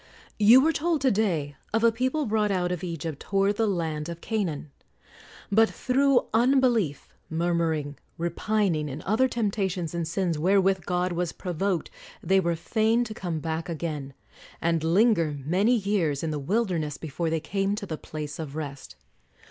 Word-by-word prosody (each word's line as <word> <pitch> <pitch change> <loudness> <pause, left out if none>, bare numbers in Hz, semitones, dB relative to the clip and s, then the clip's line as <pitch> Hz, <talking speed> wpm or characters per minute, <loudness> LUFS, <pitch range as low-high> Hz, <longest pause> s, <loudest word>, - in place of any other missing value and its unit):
You 225 +5 +8
were 320 +3 +3
told 320 +1 0
to 265 -2 +3
day 170 -9 0 0.2
of 225 - +1
a 230 - +6
people 260 +6 -1
brought 215 -1 +1
out 180 -2 0
of 180 0 -3
Egypt 165 -4 -4
toward 195 +1 +1
the 225 - +2
land 165 -5 -2
of 170 -1 -6
Canaan; 170 -9 -3 0.8
but 220 +2 +5
through 265 0 +2
unbelief, 235 - +2 0.2
murmuring, 160 -4 -1 0.2
repining, 170 -2 0
and 140 +4 -7
other 225 +6 +2
temptations 195 -8 -2
and 170 -2 -2
sins 170 -2 -1
wherewith 190 +1 +2
God 180 0 0
was 175 -1 -1
provoked, 180 0 -2 0.3
they 190 0 +3
were 170 -2 0
fain 220 +7 +1
to 220 -2 -6
come 175 -6 -4
back 160 +1 -3
again, 150 -5 -4 0.4
and 165 -1 0
linger 170 -3 +3
many 195 +10 +3
years 190 - 0
in 160 - -1
the 150 - -2
wilderness 165 -4 -1
before 160 +3 -3
they 160 0 0
came 195 +5 -1
to 210 -1 -5
the 160 - -4
place 150 -1 -7
of 150 -3 -6
rest. 140 -3 -6
180 Hz, 165 wpm, -26 LUFS, 160-215 Hz, 0.8 s, You